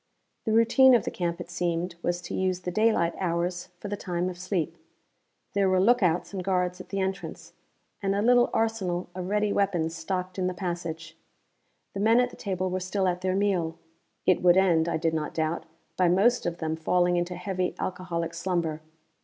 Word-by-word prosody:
The 220 - 0
routine 245 +4 +6
of 235 - +1
the - - -2
camp, 170 -1 -2
it 175 0 -8
seemed, 175 0 -1
was 175 0 -1
to - - -6
use 185 -1 0
the 180 - -3
daylight 215 -4 +2
hours 175 0 -1
for - - -6
the 205 - -2
time 180 -2 -2
of 180 -1 -8
sleep. 180 -2 -2 0.8
There 200 -2 +2
were 185 0 +3
lookouts 190 -5 +2
and 190 -2 -3
guards 180 -1 0
at - - -14
the 195 - -2
entrance, 190 -3 -4 0.5
and 195 -1 0
a 200 - +1
little 245 +1 +5
arsenal 190 -6 -1
of 185 0 -5
ready 210 0 +1
weapons 175 -5 +1
stocked 185 +3 -3
in 185 - +1
the 185 - -3
passage. 170 -3 -5 0.8
The 195 - -4
men 225 +4 +4
at 250 0 +2
the - - -11
table 185 -3 -2
were 185 - -1
still 185 +1 -1
at 180 0 -1
their 185 0 0
meal. 180 -5 0 0.5
It 185 - +3
would 180 0 +5
end, 170 -3 +3
I 165 - 0
did 165 0 0
not 155 -2 -3
doubt, 160 +1 -1 0.3
by 180 -2 +4
most 200 +5 +3
of 170 0 -3
them 160 -1 -2
falling 175 +2 +2
into 175 +1 -1
heavy 180 0 -2
alcoholic 170 -2 -3
slumber. 170 -3 -2
180 Hz, 195 wpm, -27 LUFS, 170-195 Hz, 0.8 s, routine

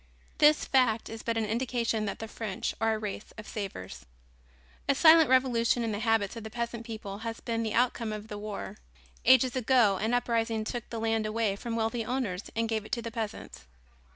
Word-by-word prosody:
This 300 0 +5
fact 245 -4 +2
is 225 0 -7
but 230 -1 -1
an 225 - +1
indication 230 -1 -1
that 200 - -3
the 225 - -6
French 215 -3 -4
are 225 0 +2
a - - -2
race 210 -1 -6
of 215 - -9
savers. 195 - -6 0.9
A 280 - +4
silent 320 0 +7
revolution 245 -2 +3
in 225 - -1
the 205 - -3
habits 225 -2 +1
of 230 - -7
the 220 - -6
peasant 235 0 -4
people 210 -3 -6
has 225 0 -5
been 230 -1 -2
the 220 -2 -2
outcome 235 -2 +1
of 215 0 -6
the 210 -1 -6
war. 210 -1 -6 0.5
Ages 260 0 +5
ago 240 -5 +3
an 220 +5 0
uprising 230 -2 0
took 240 +1 -5
the 230 - -4
land 225 -1 0
away 215 -2 0
from 230 +3 -5
wealthy 230 +1 -1
owners 220 -6 -3
and 230 0 0
gave 220 -2 -1
it 215 - -13
to 235 -3 -1
the 230 - -5
peasants. 215 - -6
225 Hz, 205 wpm, -29 LUFS, 215-240 Hz, 0.9 s, silent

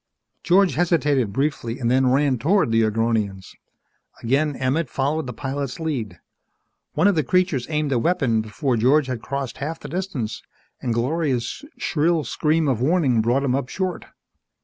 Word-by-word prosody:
George 185 +1 +3
hesitated 145 - +1
briefly 135 -2 -2
and 120 -2 0
then 130 0 +3
ran 135 -2 +2
toward 170 - +2
the 115 0 +3
Agronians. 110 -3 -1 0.7
Again 140 +5 +1
Emmett 135 +3 -1
followed 140 +3 -1
the - - -4
pilot's 135 +2 -4
lead. 120 - -3 0.7
One 160 +6 +3
of 205 - +4
the 160 - +2
creatures 180 -4 +1
aimed 150 -2 -1
a 125 - +2
weapon 135 -8 +1
before 115 +4 -1
George 135 +6 +4
had 125 -3 -4
crossed 140 -3 -4
half 155 +4 -4
the - - -8
distance 175 - -4 0.4
and 120 - -2
Gloria's 130 - -1
shrill 160 +1 +1
scream 155 +5 0
of 125 -4 0
warning 135 -5 +2
brought 120 +5 +1
him 130 -3 +1
up 135 -1 -1
short. 185 -2 -3
135 Hz, 160 wpm, -22 LUFS, 120-160 Hz, 0.7 s, of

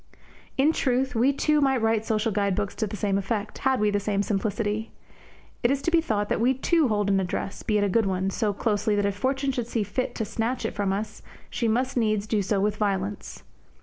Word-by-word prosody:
In 290 +4 +4
truth, 260 -1 0
we 245 +4 +3
too 300 +2 +2
might 270 -2 +3
write 225 -1 +2
social 220 0 +1
guide 200 -2 +1
books 200 +1 -2
to 215 - -2
the 205 - -5
same 200 0 +1
effect, 205 +1 -3
had 265 -1 +1
we 210 0 +2
the 205 - +1
same 200 0 0
simplicity. 210 +1 -1 0.7
It 240 - +3
is 275 +1 0
to 340 - +1
be 335 -1 +4
thought 210 -9 -1
that - - 0
we 255 +3 +3
too 315 +3 +2
hold 205 -3 0
an 195 - +3
address, 190 +1 -3
be 215 - 0
it 205 - +2
a - - +2
good 210 +2 +2
one, 190 0 0
so 215 0 0
closely 210 0 0
that 205 0 +1
if 200 -1 0
Fortune 270 +5 0
should 245 -3 -3
see 230 -2 -1
fit 255 +5 -3
to 220 - -2
snatch 225 +3 -2
it - - -2
from 200 -2 -1
us, 205 +3 -4 0.3
she 240 -1 -1
must 250 +4 0
needs 215 -3 +1
do 215 -1 0
so 195 +1 0
with 210 +1 0
violence. 200 -1 -2
215 Hz, 235 wpm, -26 LUFS, 205-250 Hz, 0.7 s, In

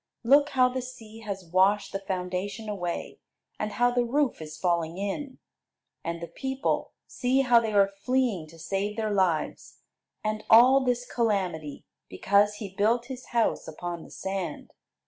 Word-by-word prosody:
Look 285 +4 +5
how 255 0 +6
the 255 +1 -3
sea 225 -3 -10
has 200 -4 -6
washed 190 +4 +2
the 195 - -3
foundation 190 +3 -4
away, 175 -5 -4 0.4
and 215 0 -3
how 245 0 +3
the 245 0 +2
roof 260 - 0
is 155 0 -8
falling 170 -1 0
in! 255 +8 -4 0.7
And 170 0 -3
the 170 - -6
people; 265 - -2
see 260 +1 +1
how 245 -3 +5
they 225 -2 -2
are 200 -1 +5
fleeing 200 -3 -1
to 165 +2 -15
save 195 +6 -3
their 215 -1 -1
lives! 185 -6 -1 0.4
And 215 0 -2
all 250 +4 +8
this 245 -1 0
calamity 185 - -2 0.2
because 200 - +2
he 205 -3 -7
built 225 +5 +2
his 255 0 -11
house 235 -1 0
upon 170 +2 -5
the - - -13
sand. 190 -1 -5
205 Hz, 160 wpm, -27 LUFS, 185-245 Hz, 0.7 s, all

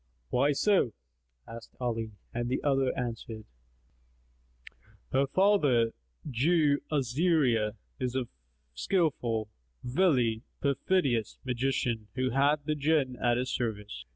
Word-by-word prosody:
"Why 140 +4 +3
so?" 185 - +2 0.5
asked 115 0 -10
Ali 115 -3 -2 0.2
and 120 0 -2
the 130 - -1
other 135 -2 +2
answered, 115 -2 -5 1.7
"Her 135 +1 +2
father, 145 - +3 0.4
Jew 145 +2 +2
Azariah, 135 - +2 0.3
is 125 -1 -2
a 130 -2 -1 0.5
skilful, 120 - 0 0.3
wily, 125 -6 +2 0.2
perfidious 140 - 0
magician 125 -3 -1
who 130 0 0
hath 145 +2 +2
the 155 - +1
Jinn 145 -3 +1
at 120 -1 +2
his 125 +1 -2
service. 105 - -4
130 Hz, 105 wpm, -29 LUFS, 115-145 Hz, 1.7 s, Why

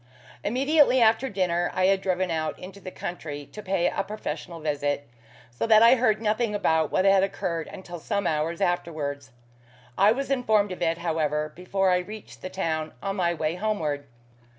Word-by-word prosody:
Immediately 270 +4 +3
after 230 +3 +4
dinner 175 -4 0
I 185 - +2
had 195 0 +3
driven 185 -1 0
out 155 -1 -2
into 190 +2 -10
the 190 - -7
country 150 -6 -6
to 210 - -10
pay 190 -3 +1
a - - -1
professional 170 -5 -6
visit, 145 -2 -2 0.4
so 120 - -2
that 220 0 +7
I 235 +2 +8
heard 230 -4 +2
nothing 220 0 0
about 160 -6 +1
what 185 - +2
had 195 -1 +6
occurred 170 -4 -2
until 175 -3 -9
some 200 +4 -2
hours 160 +1 -1
afterwards. 145 -6 -2 0.7
I 200 +2 +6
was 275 +4 -2
informed 215 -6 +2
of 185 - -7
it, 165 -1 +1
however, 155 -3 -1
before 190 +1 0
I 180 - +3
reached 210 +4 -9
the 185 - -5
town, 160 -4 -2
on 195 0 -2
my 175 -2 +1
way 155 0 -1
homeward. 165 -8 -2
180 Hz, 175 wpm, -26 LUFS, 160-210 Hz, 0.7 s, I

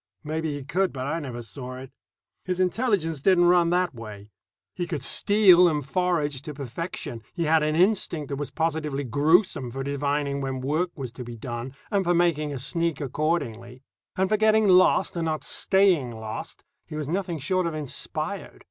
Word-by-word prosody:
Maybe 155 0 -2
he 145 - -6
could, 185 +7 0
but 130 -1 -5
I 160 +4 -1
never 125 -6 -6
saw 125 +2 -7
it. 130 0 -10 0.5
His 185 -1 -3
intelligence 185 - 0
didn't 175 +1 +4
run 175 -1 +4
that 180 -1 +1
way. 105 -3 -10 0.4
He 175 -1 -3
could 155 -6 -4
steal 185 0 +6
and 150 -4 -1
forage 150 -3 0
to 150 0 -8
perfection; 140 -2 -6
he 170 - -1
had 160 0 +3
an 155 0 0
instinct 175 -5 +1
that 140 - -3
was 145 0 -4
positively 155 -3 -2
gruesome 145 - +2
for 135 +3 -5
divining 140 0 -1
when 135 -1 -3
work 155 +7 0
was 130 -5 -6
to 125 +2 -8
be 120 -1 -8
done 120 +3 -6 0.2
and 200 -2 +2
for 175 -1 +2
making 165 -4 +1
a 140 - -4
sneak 165 +5 -1
accordingly; 130 -4 -2 0.3
and 190 +1 +2
for 215 - +2
getting 220 0 +4
lost 185 -1 +4
and 170 -1 -1
not 155 -1 -2
staying 190 -9 +2
lost 110 0 -7 0.2
he - - -8
was 150 -2 -3
nothing 175 0 -2
short 180 +5 0
of 165 - -3
inspired. 150 -4 -5
155 Hz, 185 wpm, -25 LUFS, 135-175 Hz, 0.5 s, steal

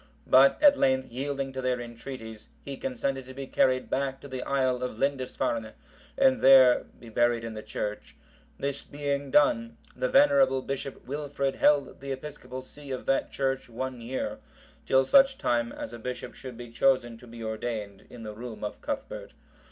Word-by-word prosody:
But 135 +1 +6
at 290 -1 +7
length 130 -1 +2
yielding 135 +1 -3
to 130 - -4
their 125 -1 0
entreaties, 115 -2 -8 0.2
he 140 - -5
consented 135 +1 -3
to 130 0 -11
be 135 0 -5
carried 130 -1 +2
back 135 0 -1
to - - -9
the 130 -2 -5
isle 130 -2 0
of 125 -3 -4
Lindisfarne, 125 -4 -1 0.4
and 265 -2 +4
there 130 -2 +7
buried 120 0 +1
in 115 -1 -5
the 110 - -6
church.(760) 105 0 -5 0.4
This 140 0 -3
being 140 -1 -3
done, 225 - +3 0.2
the - - -1
venerable 275 - +4
Bishop 135 0 -5
Wilfrid 140 -1 -2
held 145 -1 +3
the 140 0 -6
episcopal 130 -2 -7
see 145 +2 -12
of 130 -1 -4
that 135 - +1
church 135 -2 -1
one 125 +1 -5
year,(761) 125 +3 -7
till 130 0 +4
such 270 - +5
time 120 -1 0
as 115 - -7
a 120 - -8
bishop 125 +2 -5
should 130 -3 -9
be 120 -1 -9
chosen 120 -1 +2
to 125 - -14
be 115 0 -9
ordained 110 -2 -5
in 120 -2 -10
the 105 -1 -6
room 115 0 -8
of 105 - -5
Cuthbert. - - -5
130 Hz, 175 wpm, -28 LUFS, 120-140 Hz, 0.4 s, at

